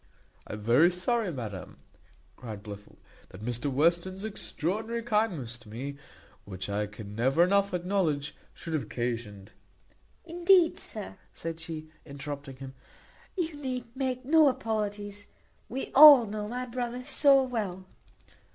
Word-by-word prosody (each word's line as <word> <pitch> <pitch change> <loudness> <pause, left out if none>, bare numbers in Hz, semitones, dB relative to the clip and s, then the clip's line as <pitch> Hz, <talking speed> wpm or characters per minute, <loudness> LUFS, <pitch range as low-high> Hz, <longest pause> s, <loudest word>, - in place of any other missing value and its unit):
"I - - -7
am 105 - -5
very 125 +10 +5
sorry, 190 +3 -1
madam," 110 - -7 0.6
cried 110 -4 -8
Blifil, 105 -1 -10 0.3
"that 95 +3 -11
Mr 120 +4 -1
Western's 170 +7 +1
extraordinary 220 +3 -3
kindness 190 - -1
to 120 -3 -16
me, 135 +6 -6 0.5
which 95 0 -6
I 105 +1 -1
can 105 0 -10
never 130 +8 +3
enough 200 +2 +2
acknowledge, 175 -5 -1 0.2
should 165 - -8
have 155 - +1
occasioned 115 -6 -4 0.4
" - - -36
"Indeed, 350 0 +4
sir," - - -7 0.2
said 165 -1 -5
she, 155 -1 -7
interrupting 140 -1 -7
him, 130 0 -9 0.6
"you 335 -3 -1
need 250 -3 -5
make 260 -1 -2
no 310 +2 +6
apologies, 205 -5 -2 0.4
we 265 +3 -4
all 285 -4 +10
know 210 0 -4
my 250 +3 -4
brother 245 0 -4
so 275 -1 +5
well." 205 -7 -4
180 Hz, 135 wpm, -29 LUFS, -, 0.6 s, all